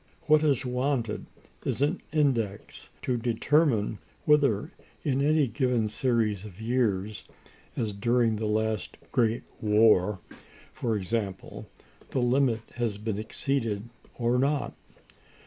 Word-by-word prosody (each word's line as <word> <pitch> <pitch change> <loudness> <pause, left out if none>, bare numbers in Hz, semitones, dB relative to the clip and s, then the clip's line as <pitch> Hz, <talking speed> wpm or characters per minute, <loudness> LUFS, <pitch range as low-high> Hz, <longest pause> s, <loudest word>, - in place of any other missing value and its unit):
What 155 -1 +5
is 145 -5 +2
wanted 125 -3 -1 0.4
is - - -1
an 155 +6 0
index 120 -10 -1
to 125 -2 0
determine 120 -1 +1 0.3
whether, 145 -3 +3 0.3
in 140 -3 +1
any 150 0 +3
given 125 -3 0
series 110 -3 0
of 105 -2 -11
years, 110 -4 -1 0.5
as 110 -3 -1
during 115 +1 +2
the 110 0 -2
last 110 0 -1
great 115 -4 +1 0.2
war, 105 -2 +4 0.6
for 115 -3 -1
example, 100 -1 -4 0.4
the - - -1
limit 125 -2 +2 0.2
has 115 -4 -1
been 105 -1 -3
exceeded 115 -2 -2 0.3
or 120 +1 +2
not. 140 +2 0
115 Hz, 115 wpm, -28 LUFS, 105-135 Hz, 0.6 s, What